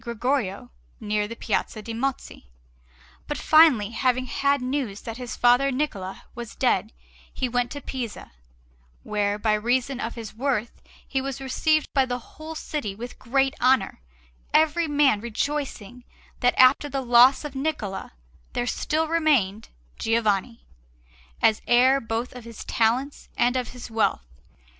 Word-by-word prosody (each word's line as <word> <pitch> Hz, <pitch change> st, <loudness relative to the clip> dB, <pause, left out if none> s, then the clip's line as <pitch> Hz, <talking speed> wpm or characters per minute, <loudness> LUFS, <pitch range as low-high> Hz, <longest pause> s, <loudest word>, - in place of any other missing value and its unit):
Gregorio 235 Hz, -, -2 dB, 0.3 s
near 210 Hz, 0 st, -1 dB
the 230 Hz, -, -7 dB
Piazza 225 Hz, -, -2 dB
de' 230 Hz, +2 st, -6 dB
Mozzi. 250 Hz, -, -4 dB, 0.8 s
But -, -, -3 dB
finally, 300 Hz, -10 st, +5 dB
having 255 Hz, +1 st, +1 dB
had 280 Hz, +2 st, +1 dB
news 250 Hz, -5 st, -3 dB
that 225 Hz, 0 st, -7 dB
his 250 Hz, -1 st, -6 dB
father 245 Hz, +3 st, +4 dB
Niccola 205 Hz, -9 st, -3 dB
was 240 Hz, -2 st, -8 dB
dead, -, -, +1 dB, 0.4 s
he 255 Hz, -, -2 dB
went 245 Hz, 0 st, 0 dB
to 285 Hz, -, -7 dB
Pisa, 250 Hz, -6 st, -6 dB, 0.7 s
where, 205 Hz, -1 st, -1 dB
by 215 Hz, 0 st, +1 dB
reason 245 Hz, +4 st, 0 dB
of 230 Hz, -3 st, -4 dB
his 225 Hz, -3 st, -8 dB
worth, 240 Hz, -1 st, -2 dB, 0.3 s
he 270 Hz, -, -1 dB
was 270 Hz, -1 st, -4 dB
received 310 Hz, +4 st, +1 dB
by 270 Hz, -2 st, +3 dB
the 245 Hz, 0 st, -2 dB
whole 310 Hz, +6 st, -10 dB
city 290 Hz, -10 st, -4 dB
with 240 Hz, +4 st, -8 dB
great 270 Hz, +2 st, +1 dB
honour, 255 Hz, -, +2 dB, 0.5 s
every 320 Hz, +2 st, +3 dB
man 285 Hz, -8 st, +3 dB
rejoicing 245 Hz, -1 st, -4 dB, 0.4 s
that 245 Hz, -, +2 dB
after 260 Hz, +3 st, +5 dB
the 275 Hz, 0 st, -2 dB
loss 245 Hz, +3 st, +5 dB
of 295 Hz, -, -6 dB
Niccola 265 Hz, -, -3 dB, 0.4 s
there 245 Hz, -, -1 dB
still 315 Hz, +5 st, -1 dB
remained 280 Hz, -11 st, +1 dB, 0.3 s
Giovanni, 225 Hz, 0 st, 0 dB, 0.8 s
as 215 Hz, -, +4 dB
heir 260 Hz, +3 st, +5 dB
both 225 Hz, +2 st, -3 dB
of 250 Hz, -1 st, -10 dB
his 230 Hz, -1 st, -10 dB
talents 250 Hz, +5 st, 0 dB
and 245 Hz, +1 st, +2 dB
of 255 Hz, -1 st, -1 dB
his 245 Hz, -2 st, -10 dB
wealth. 220 Hz, -, 0 dB
245 Hz, 145 wpm, -25 LUFS, 225-275 Hz, 0.8 s, finally